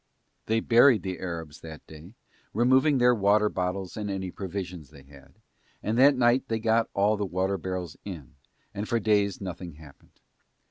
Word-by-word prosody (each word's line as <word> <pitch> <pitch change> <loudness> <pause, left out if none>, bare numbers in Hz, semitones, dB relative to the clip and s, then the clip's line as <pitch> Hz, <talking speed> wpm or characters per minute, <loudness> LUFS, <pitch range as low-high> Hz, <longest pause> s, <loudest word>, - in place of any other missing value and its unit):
They 115 +1 +1
buried 120 -3 +5
the 95 -1 -4
Arabs 80 -4 -6
that 80 -2 -11
day, 80 +7 -13 0.4
removing 130 +5 +3
their 125 0 +4
water 105 -1 +3
bottles 90 0 -3
and 105 -2 -4
any 95 -2 -4
provisions 90 -5 -6
they 70 -3 -16
had, 70 -1 -18 0.5
and 110 - -1
that 140 +2 +6
night 125 +2 +2
they 115 - -1
got 115 0 +1
all 105 +2 +2
the 105 - -2
water 95 +2 -1
barrels 90 -4 -5
in, 85 -11 -9 0.4
and 105 +2 -5
for 115 - +1
days 105 -2 +1
nothing 90 -3 -7
happened. 75 -2 -18
100 Hz, 170 wpm, -27 LUFS, 85-110 Hz, 0.5 s, that